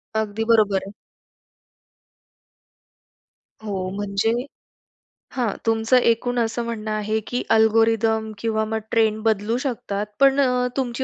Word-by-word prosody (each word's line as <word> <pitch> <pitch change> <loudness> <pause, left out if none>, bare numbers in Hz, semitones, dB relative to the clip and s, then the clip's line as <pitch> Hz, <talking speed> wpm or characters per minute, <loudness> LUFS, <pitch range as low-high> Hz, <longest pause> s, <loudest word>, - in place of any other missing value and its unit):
अगदी 220 0 -1
बरोबर 205 -4 +3
आहे. - - -8 2.7
हो, 190 -3 -3
म्हणजे 205 +2 0 1.0
हां, 240 -6 0
तुमचं 225 +2 +3
एकूण 245 +1 +1
असं 230 +1 -1
म्हणणं 220 -2 -4
आहे, 215 +1 -1
की 245 - -2 0.2
अल्गोरिदम 220 0 +2
किंवा 220 0 -1
मग 220 0 -2
ट्रेंड 220 -2 +2
बदलू 220 +1 +1
शकतात, 205 -4 -3
पण 275 0 +5
अ, 250 0 +1
तुमची 255 0 -2
220 Hz, 115 wpm, -22 LUFS, 215-235 Hz, 2.7 s, पण